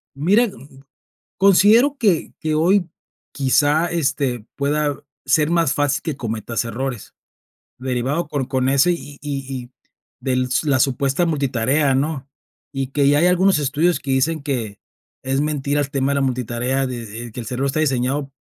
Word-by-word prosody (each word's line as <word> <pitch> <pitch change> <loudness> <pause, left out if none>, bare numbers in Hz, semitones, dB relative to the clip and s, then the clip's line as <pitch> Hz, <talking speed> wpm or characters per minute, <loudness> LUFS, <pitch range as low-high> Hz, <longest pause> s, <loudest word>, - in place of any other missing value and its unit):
Mira, 200 - +3
mm, - - -8 0.3
mm, - - -20 0.5
considero 215 +9 +5
que 195 -10 +1
que 155 -1 -2
hoy, 175 +3 +2 0.4
quizá, 145 +4 +2
este, 140 -8 -1
pueda 145 0 -1 0.2
ser 155 0 +3
más 165 -5 +2
fácil 145 -1 0
que 155 -5 -4
cometas 115 -1 -3
errores, 120 0 -5 0.6
derivado 130 +5 -2
por 140 -4 -3
con 130 -1 0
ese 140 +6 +4
y 145 -4 -6
y 140 -2 -4 0.2
y 120 - -16 0.5
del 130 -1 0
s 125 +5 -1
la 140 -2 +3
supuesta 135 +5 +1
multitarea, 140 -2 +1
¿no? 140 0 -2 0.5
Y 135 -1 -2
que 140 +1 +1
ya 145 +1 +4
hay 170 - +3
algunos 180 -1 +3
estudios 150 +5 +1
que 135 - -4
dicen 155 +4 +1
que 120 -8 -4 0.4
es 135 +1 0
mentira 145 -1 -1
el 145 -1 -1
tema 135 0 0
de - - 0
la 140 - +1
multitarea, 125 +1 -1
de, 120 -1 -6
eh, - - -12
que 115 - -8
el 120 - -6
cerebro 125 +4 -2
está 140 +3 -1
diseñado 135 -1 0
140 Hz, 170 wpm, -20 LUFS, 130-155 Hz, 0.6 s, considero